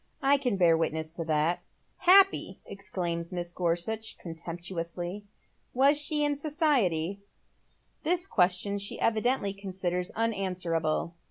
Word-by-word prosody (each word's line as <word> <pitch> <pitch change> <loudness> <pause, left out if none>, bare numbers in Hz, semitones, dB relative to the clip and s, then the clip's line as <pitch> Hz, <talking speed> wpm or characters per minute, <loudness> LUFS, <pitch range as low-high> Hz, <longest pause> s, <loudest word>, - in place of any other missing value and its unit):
i 275 +1 +5
can 250 -7 0
bear 170 -3 +5
witness 160 -1 -2
to 165 0 -5
that." 160 +2 +1 0.2
" - - -43
Happy! 390 0 +5
" - - -40
exclaims 175 -3 -4
Mrs. 175 -1 -4
Gorsuch, 180 +6 -2
contemptuously. 175 +3 -6 0.2
" - - -42
Was 275 +3 +5
she 295 0 +3
in 290 0 +1
society? 260 - 0 0.4
" - - -38
This 350 +3 +1
question 195 - +1
she 200 - -2
evidently 225 -2 +1
considers 185 -2 -3
unanswerable. 180 -7 -1
185 Hz, 135 wpm, -29 LUFS, 170-240 Hz, 0.4 s, i